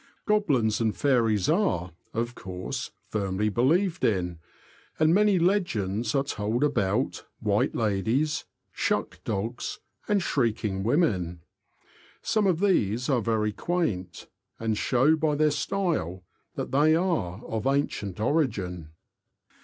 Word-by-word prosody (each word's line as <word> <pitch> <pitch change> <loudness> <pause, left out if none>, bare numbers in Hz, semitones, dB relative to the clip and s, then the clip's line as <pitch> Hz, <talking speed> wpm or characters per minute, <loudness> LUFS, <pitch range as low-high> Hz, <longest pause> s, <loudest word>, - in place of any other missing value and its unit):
Goblins 140 - +2
and 110 -2 0
fairies 115 -8 +2
are, 155 - +1 0.2
of 120 +1 -2
course, 90 -4 -5 0.2
firmly 100 0 0
believed 165 - +1
in, 90 -5 0 0.6
and 155 +1 +4
many 205 0 +4
legends 120 - 0
are 135 - +3
told 115 0 -1
about 125 -4 0
"White 105 -2 +1
Ladies,'* 115 +8 0 0.3
''Shuck - - -1
Dogs," 115 +5 -3 0.3
and 205 -1 +3
''Shrieking 110 - 0
Women." 95 - +1 0.8
Some 215 -3 +2
of 180 -2 +1
these 125 - +2
are 130 -4 +2
very 105 -1 0
quaint, 105 - -2 0.3
and 110 -1 0
show 130 +8 +3
by 155 -2 +1
their 150 0 +3
style 145 - -1 0.3
that - - -4
they 150 +4 +4
are 160 - -1
of 110 +3 -2
ancient 120 -9 -1
origin. 100 - -1
115 Hz, 120 wpm, -27 LUFS, 100-155 Hz, 0.8 s, and